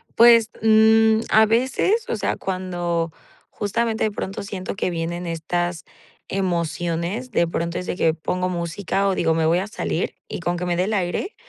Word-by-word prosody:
Pues, 230 -1 +7
mm, 220 0 +5
a 220 +1 +6
veces, 260 - +1
o - - 0
sea, 205 - -1
cuando 175 -3 -2 0.4
justamente 220 +2 -1
de 215 - 0
pronto 200 0 -5
siento 195 -1 -5
que 185 - -1
vienen 170 +1 -3
estas 175 +1 -2 0.4
emociones, 175 +4 -2
de 170 -4 +2
pronto 170 +1 -2
es 180 - -6
de - - -2
que 160 -3 +2
pongo 180 +3 -2
música, 180 +3 -1
o 190 - +1
digo: 160 -1 +2
"Me 160 0 +1
voy 170 +3 +3
a 195 - -3
salir", 190 -4 -3
y - - -5
con 175 +1 -1
que 180 - -3
me 175 - 0
dé 180 - +2
el 215 - -2
aire, 190 - -2
185 Hz, 185 wpm, -22 LUFS, 170-220 Hz, 0.4 s, Pues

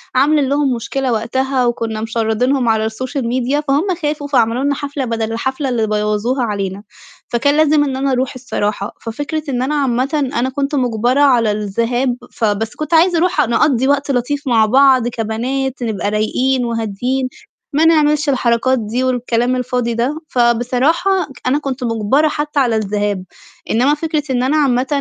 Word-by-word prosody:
عاملين 280 0 +3
لهم 285 -2 +1
مشكلة 255 +3 -2
وقتها، 255 +3 0
وكنّا 225 -2 -2
مشرّدينهم 230 +3 0
على 220 0 +1
الsocial 255 +4 -4
media 255 +4 0
فهُم 290 +8 +1
خافوا 295 -1 -2
فعملوا 245 -1 +1
لنا 285 0 +1
حفلة 280 -2 -4
بَدَل 225 -1 -2
الحفلة 265 +4 -2
اللي 230 -3 0
بوّظوها 210 +4 0
علينا، 200 -2 -3 0.4
فكان 285 +5 +1
لازم 305 -1 +4
إن 270 -2 -2
أنا 270 0 0
أرُوح 255 +1 0
الصراحة، 210 -5 -3
ففكرة 290 +7 -4
إن 250 -2 -1
أنا 290 +4 -1
عامةً 275 +1 0
أنا 245 +2 +1
كنت 280 +2 -2
مُجبرة 245 +1 +1
على 240 -6 +4
الذهاب، 230 +5 -1 0.2
فبس 220 0 -1
كنت 305 +2 -4
عايزة 340 +2 +4
أرُوح 350 -2 +2
نقضّي 245 +2 +2
وقت 280 0 +1
لطيف 275 +3 -2
مع 225 -3 +4
بعض 260 +1 +4
كبنات 245 +4 -3
نبقى 205 -4 -2
رايقين 250 +5 0
وهاديين 235 +3 -2 0.5
ما 310 +3 +3
نعملش 300 -2 +3
الحركات 255 0 +1
دي، 230 +4 -2
والكلام 245 -1 0
الفاضي 250 -1 -1
ده، 250 +7 -1
فبصراحة 250 +9 +1 0.4
أنا 275 +3 +2
كنت 275 -3 -4
مُجبرة 230 +6 +1
حتى 295 -1 -2
على 245 -4 +2
الذهاب، 205 -2 -1 0.5
إنما 255 +6 +3
فكرة 310 0 -2
إن 250 -1 +1
أنا 280 +4 +1
عامةً 265 -3 +2
255 Hz, 160 wpm, -17 LUFS, 230-280 Hz, 0.5 s, لازم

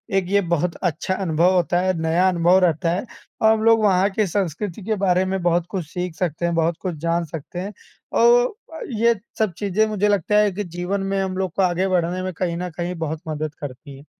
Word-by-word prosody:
एक 195 -1 +2
ये 200 +1 +3
बहुत 170 -1 -1
अच्छा 175 +2 -1
अनुभव 180 -1 +2
होता 175 0 +2
है, 185 0 +1
नया 165 +3 +2
अनुभव 175 +1 +4
रहता 165 0 +1
है 190 +7 -2 0.4
और 220 - +6
हम 220 0 -1
लोग 225 -1 +5
वहाँ 195 0 +4
के 215 +2 +1
संस्कृति 190 +1 -3
के 220 +1 0
बारे 185 -2 +2
में 190 0 -2
बहुत 175 -1 +2
कुछ 185 -5 -3
सीख 180 -1 -4
सकते 170 -1 -2
हैं, 170 - 0
बहुत 165 0 +1
कुछ 180 -4 -3
जान 170 0 +1
सकते 160 +3 -7
हैं। 200 +3 -5 0.4
औ 485 +1 +5 0.3
अ, 320 - -8
ये 235 +1 +3 0.2
सब 215 -5 +1
चीज़ें, 205 +1 +1
मुझे 210 -1 0
लगता 205 +1 +2
है 210 -1 +3
कि 200 +3 -4
जीवन 180 +2 -3
में 195 - +1
हम 185 -1 -3
लोग 190 -2 -1
को 195 - +1
आगे 180 +1 +1
बढ़ने 180 0 0
में 185 -1 -3
कहीं 170 0 -2
न 180 0 -3
कहीं 175 +1 -3
बहुत 155 +1 -4
मदद 155 -1 -3
करती 140 0 -9
हैं। 140 - -15
180 Hz, 230 wpm, -22 LUFS, 170-200 Hz, 0.4 s, और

